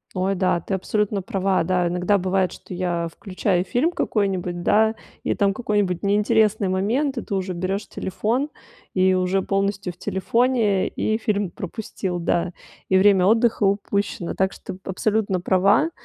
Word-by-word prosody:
Ой, 190 +1 0
да, 185 -2 +1
ты 195 - -5
абсолютно 205 +1 0
права. 195 -3 0
Да, 180 0 +1
иногда 180 +4 +1
бывает, 185 -1 0
что - - -10
я 175 -2 -1
включаю 185 0 -1
фильм 250 - +1
какой-нибудь, 190 - -1
да, 220 +4 +3 0.3
и - - +1
там 200 -1 +2
какой-нибудь 205 -6 -1
неинтересный 210 0 +2
момент, 235 +10 0
и 240 - -1
ты - - -6
уже 190 -1 -1
берёшь 185 +4 -3
телефон, 235 +9 -2 0.4
и 185 0 +3
уже 185 +1 +1
полностью 195 -1 -1
в 175 - -26
телефоне, 220 0 +1
и 220 - -1
фильм 205 -4 -1
пропустил, 185 -2 -5
да, 170 +1 0 0.4
и 190 - +4
время 190 -1 +5
отдыха 225 +2 +3
упущено. 200 -2 0
Так 190 0 +1
что - - -8
ты 185 - -12
абсолютно 200 0 0
права. 195 - +3
195 Hz, 155 wpm, -23 LUFS, 185-210 Hz, 0.4 s, время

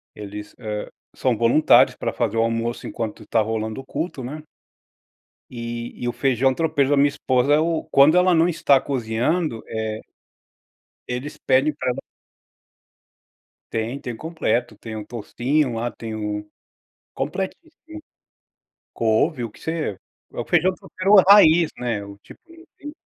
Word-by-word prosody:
eles, 105 0 -8
ah, 105 -1 -5 0.2
são 125 -3 0
voluntários 120 +8 +5
para - - -3
fazer 115 -2 -1
o 115 - +3
almoço 115 +1 -2
enquanto 110 -2 -5
tá 115 - +2
rolando 110 +2 -2
o - - -12
culto, 160 -1 -4
né. 150 +4 -6 1.1
E 120 -1 -6
e - - 0
o 120 - -1
feijão 130 -1 +2
tropeiro 155 -4 +1
da 145 - +4
minha 140 +1 +5
esposa 130 0 +1
é - - +4
o 165 0 0
quando 145 +5 +6
ela 180 -1 +4
não 165 +1 +4 0.2
tá 140 -1 +6
cozinhando, 125 +2 -1
eh 110 -1 -3 1.1
eles 125 +4 -5
pedem 135 +4 +2
para 140 -3 -2
ela - - -4 1.7
Tem, 115 +5 -3
tem 120 -3 -6
completo, 155 -5 -2
tem 110 -1 -7
um 105 - -6
toucinho 125 +4 -1
lá, 120 +1 -2
tem 115 -1 -7
um 105 -1 -4 0.7
completíssimo, 190 - -4 1.2
couve, 115 +5 +1
o 115 - -4
que - - -19
você 160 - -3 0.4
é - - -5
o - - -3
feijão 180 +2 +2
tropeiro 190 +3 0
raiz, 170 -5 +7
né, 115 -5 -2
o 100 0 -11
tipo - - -16
na 330 -3 -12
125 Hz, 150 wpm, -22 LUFS, 115-155 Hz, 1.7 s, raiz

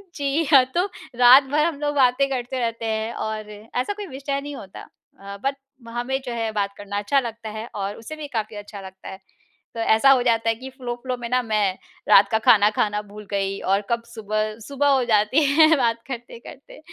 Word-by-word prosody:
जी, 285 +3 0
हाँ 270 -3 +7
तो 355 +2 +2 0.3
रात 250 +3 +8
भर 290 +3 +1
हम 325 -4 -2
लोग 290 0 -1
बातें 265 0 +3
करते 255 -1 -3
रहते 230 -1 -2
हैं 220 +1 -2
और 215 -1 -5
ऐसा 225 - -4
कोई 415 0 -7
विषय 275 -1 -4
नहीं 290 0 -7
होता 195 -7 -10 0.4
अ, 200 0 -8
बट 275 +1 0 0.3
हमें 245 +3 -2
जो 245 - -4
है 225 -1 -2
बात 200 -2 -2
करना 205 0 -5
अच्छा 240 +7 +2
लगता 230 -3 -6
है 220 +1 -6
और 200 0 -3
उसे 230 +7 -8
भी 305 -1 -7
काफ़ी 215 0 -3
अच्छा 205 -1 -9
लगता 190 0 -11
है। 190 - -8 0.6
तो - - -5
ऐसा 225 +4 +4
हो 260 -2 +5
जाता 230 -2 +2
है 225 - +1
कि 260 +4 -9
फ़्लो-फ़्लो 250 -1 -5
में 240 -1 -6
ना 250 +1 +2
मैं 210 -4 0 0.3
रात 200 0 +7
का 220 - +3
खाना 210 -1 +7
खाना 210 0 +1
भूल 210 0 -12
गई 195 0 -1
और 195 +1 +3
कब 235 -1 0
सुबह 215 -2 -3
सुबह 280 +1 0
हो 270 -2 +3
जाती 215 +8 +3
है 310 +3 +5
बात 230 -3 0
करते-करते। 240 +2 -10
235 Hz, 210 wpm, -23 LUFS, 210-270 Hz, 0.6 s, रात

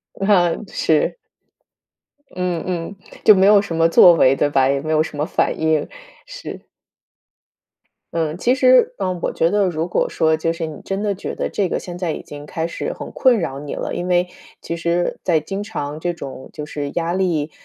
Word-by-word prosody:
啊， 195 -3 +3 0.2
是。 160 - +1 1.2
嗯 180 -2 -2
嗯， 175 +2 -4 0.3
就 215 - +8
没 190 -1 +4
有 205 0 +6
什 200 -5 -6
么 165 0 +4
作 175 +1 +7
为， 135 -5 +4
对 145 - +1
吧？ 135 -2 +3
也 140 0 0
没 155 +1 -4
有 155 - +3
什 155 - -4
么 150 - 0
反 - - 0
应， 160 -2 +1 0.4
是。 - - -9 1.5
嗯， 160 0 -1
其 245 +7 +2
实 - - +4
呃， 185 -1 -2
我 - - -2
觉 165 - +2
得 205 -1 +2
如 160 -1 -2
果 - - 0
说 160 -1 +1
就 165 +1 -1
是 165 0 -4
你 155 -2 -8
真 195 +2 -3
的 205 - 0
觉 195 - -6
得， - - -2
这 195 -3 0
个 - - -2
现 175 -1 -7
在 175 -3 -2
已 - - -6
经 145 0 -10
开 160 +2 -3
始 170 - -4
很 - - -8
困 255 -4 +3
扰 140 -6 -3
你 145 0 -6
了， - - -4
因 175 - -3
为 180 0 +2 0.3
其 170 - -4
实 170 +1 -1
在 160 -4 +2
经 195 +5 -5
常 150 -8 -5
这 175 +1 -2
种 135 -5 -9
就 150 - -6
是 145 -1 -5
压 170 0 -2
力， 170 -5 0
170 Hz, 220 characters per minute, -20 LUFS, 155-190 Hz, 1.5 s, 就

